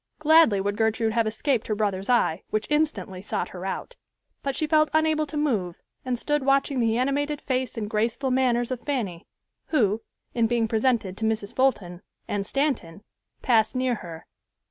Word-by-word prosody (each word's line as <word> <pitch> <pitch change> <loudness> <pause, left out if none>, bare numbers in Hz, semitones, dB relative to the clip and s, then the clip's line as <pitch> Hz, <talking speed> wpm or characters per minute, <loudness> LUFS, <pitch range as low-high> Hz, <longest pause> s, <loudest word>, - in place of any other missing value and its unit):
Gladly 310 -9 +5
would 205 +1 -2
Gertrude 220 0 +1
have 230 -1 +2
escaped 225 +2 -1
her 215 - 0
brother's 200 -1 -2
eye, 210 -8 +2
which 215 0 -1
instantly 295 -11 0
sought 200 - -3
her 185 +1 -6
out; - - -5 0.4
but 275 -1 -2
she 310 - 0
felt 310 0 +3
unable 315 -1 +2
to 295 - -5
move, 215 - -1 0.2
and 255 -1 -1
stood 295 +3 -1
watching 275 0 +2
the 225 -1 +2
animated 285 +3 0
face 255 -2 -2
and 215 -2 -2
graceful 230 +5 -1
manners 250 -1 +1
of 255 - -2
Fanny, 225 - -3 0.4
who, 220 -8 +1 0.3
in 230 -2 +2
being 235 -1 +1
presented 220 -3 +1
to 220 - -2
Mrs. 220 -2 -2
Fulton 195 -10 0 0.3
and 200 -1 -2
Stanton, 255 - -1 0.4
passed 225 -1 +3
near 255 -1 +1
her. 165 -2 -9
235 Hz, 170 wpm, -25 LUFS, 210-275 Hz, 0.4 s, Gladly